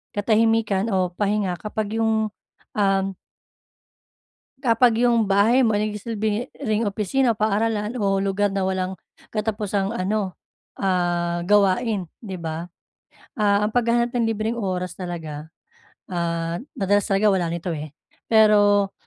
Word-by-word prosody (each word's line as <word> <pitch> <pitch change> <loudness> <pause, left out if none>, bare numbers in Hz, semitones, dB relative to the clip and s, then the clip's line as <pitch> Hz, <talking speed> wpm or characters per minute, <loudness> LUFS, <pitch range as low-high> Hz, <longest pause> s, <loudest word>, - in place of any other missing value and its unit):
katahimikan 220 -1 +2
o 185 -1 +1
pahinga 200 -1 0
kapag 215 +1 -3
yung 220 -1 +1 0.5
um 195 -1 +2 1.6
Kapag 235 -1 +4
'yong 235 -2 +3
bahay 205 +6 +4
mo 220 - +2
nagsisilbi 215 +2 -2
ring 215 +1 0
opisina 215 +5 +1
o 220 - -10
paaralan 215 +1 0
o 195 -4 +1
lugar 200 +1 0
na 195 -1 0
walang 185 0 -1 0.4
katapusang 210 -1 -1
ano, 195 -2 -2 0.4
ah, 175 -2 0
gawain, 205 +1 +2 0.2
'di 195 -5 -6
ba? 165 +1 -5 0.7
Ah, 205 -1 +3
ang 215 - -1
paghahanap 235 0 +2
ng 235 -2 +1
libreng 225 +2 -2
oras 185 -4 -2
talaga, 160 -4 -6 0.6
ah, 170 0 -2 0.2
madalas 205 +2 +1
talaga 205 +1 +3
wala 180 -3 0
nito, 170 +1 -3
eh. 150 -1 -6 0.3
Pero 205 -2 +5
205 Hz, 125 wpm, -23 LUFS, 185-220 Hz, 1.6 s, Pero